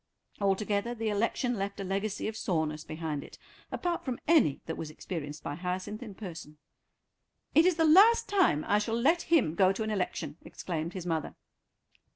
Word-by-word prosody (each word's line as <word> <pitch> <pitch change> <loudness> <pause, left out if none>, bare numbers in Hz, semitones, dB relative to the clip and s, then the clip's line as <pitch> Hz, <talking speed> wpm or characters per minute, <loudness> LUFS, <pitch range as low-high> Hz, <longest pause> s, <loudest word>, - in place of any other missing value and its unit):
Altogether 200 +3 0
the 225 -1 -2
election 230 +4 0
left 200 +1 -3
a - - -2
legacy 195 +3 -2
of 220 - -4
soreness 155 -7 -1
behind 155 -3 -4
it, - - -13 0.3
apart 350 -1 -2
from 255 -3 -3
any 300 - +4
that 160 - -4
was 160 - -6
experienced 155 -2 -6
by - - -3
Hyacinth 185 - -4
in 215 -5 -8
person. 165 -7 -8 1.0
"It 325 +3 +6
is 365 - +3
the 325 0 +3
last 400 +9 +7
time 365 - +2
I 205 +2 +3
shall 225 +2 -1
let 325 +8 +3
him 300 - +2
go 185 +2 +4
to 195 +3 -2
an 220 - -2
election," 175 -6 -3
exclaimed 165 -1 -5
his 185 -3 -6
mother. 160 -3 -2
200 Hz, 180 wpm, -30 LUFS, 165-235 Hz, 1.0 s, last